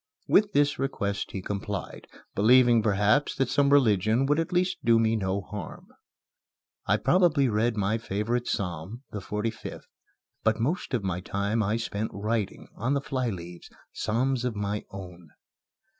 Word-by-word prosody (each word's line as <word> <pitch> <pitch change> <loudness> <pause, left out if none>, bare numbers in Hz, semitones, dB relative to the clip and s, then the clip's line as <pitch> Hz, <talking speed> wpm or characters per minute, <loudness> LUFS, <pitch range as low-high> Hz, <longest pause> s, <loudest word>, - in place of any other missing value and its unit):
With 205 0 +4
this 145 -1 +2
request 100 -7 -2
he 95 - -6
complied, 100 0 -5 0.3
believing, 120 +2 +5
perhaps, 105 +6 +2
that 135 -2 0
some 140 -1 +3
religion 115 -2 +4
would 145 +3 +2
at 165 +3 -2
least 180 +1 0
do 115 -1 +5
me 115 0 +2
no 95 -1 -1
harm. 100 -3 -8 1.0
I - - +3
probably 170 -7 +3
read 110 +1 +1
my 105 +3 +1
favorite 115 +3 -2
psalm, 95 - -4
the 105 - -4
45th; 105 +3 -4 0.6
but 110 0 +1
most 140 +3 -1
of 115 - -2
my 90 -2 -1
time 100 +4 -1
I 105 +2 +1
spent 110 -1 -3
writing, 105 0 -2
on 130 +6 0
the - - +2
flyleaves, 95 -11 -4 0.2
psalms 125 +3 0
of 125 -3 -2
my 105 0 -3
own. 90 -4 -10
110 Hz, 150 wpm, -27 LUFS, 100-130 Hz, 1.0 s, believing